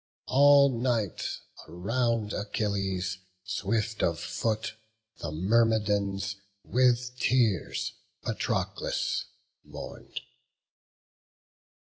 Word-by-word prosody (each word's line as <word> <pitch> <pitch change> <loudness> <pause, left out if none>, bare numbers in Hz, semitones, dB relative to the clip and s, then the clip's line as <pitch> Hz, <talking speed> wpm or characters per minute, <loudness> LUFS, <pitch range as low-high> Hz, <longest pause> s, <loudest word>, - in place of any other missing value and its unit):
All 140 -2 +6
night 115 -6 0 0.4
around 110 +5 0
Achilles 95 -4 -1 0.2
swift 105 +2 -1
of 85 -1 +1
foot 110 +6 -1 0.5
The - - -4
Myrmidons 100 +1 +2 0.3
with 125 0 +2
tears 115 -7 +1 0.3
Patroclus - - -1 0.4
mourn'd. - - -8
110 Hz, 65 wpm, -29 LUFS, 95-120 Hz, 0.5 s, All